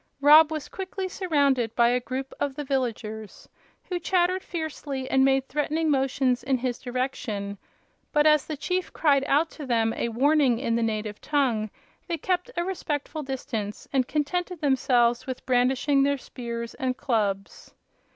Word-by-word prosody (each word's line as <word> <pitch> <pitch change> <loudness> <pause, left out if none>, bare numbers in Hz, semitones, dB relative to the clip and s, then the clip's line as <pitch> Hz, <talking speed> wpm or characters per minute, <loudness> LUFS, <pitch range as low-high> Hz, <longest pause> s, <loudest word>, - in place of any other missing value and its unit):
Rob 300 +2 +7
was 310 -2 -4
quickly 380 0 -5
surrounded 280 - +1
by 235 0 +5
a 250 +1 +1
crowd 260 +2 -4
of 285 -2 -1
the 295 - -4
villagers, 230 -6 -3 0.4
who 360 -1 -3
chattered 365 +1 +1
fiercely 300 -6 -5
and 265 0 +3
made 270 0 +3
threatening 300 +3 0
motions 265 -2 +1
in 260 +1 +1
his 250 -1 -3
direction; 240 -6 -3 0.5
but 295 0 +3
as 305 -1 +4
the 310 - -4
chief 365 +5 -2
cried 280 -4 +3
out 300 +4 +2
to 305 - -9
them 225 -2 +2
a 235 - -2
warning 270 +1 +3
in 230 0 -1
the 235 - +1
native 215 -2 -2
tongue 250 -8 0 0.4
they 340 -1 -2
kept 360 +5 -1
a 345 - +1
respectful 310 -4 -3
distance 235 -7 -5
and 260 -2 +2
contented 350 +4 -2
themselves 255 -4 +2
with 260 -1 -5
brandishing 260 +3 +2
their 280 +1 +2
spears 235 -3 -6
and 255 -1 -2
clubs. 200 -6 -2
270 Hz, 160 wpm, -26 LUFS, 240-305 Hz, 0.5 s, Rob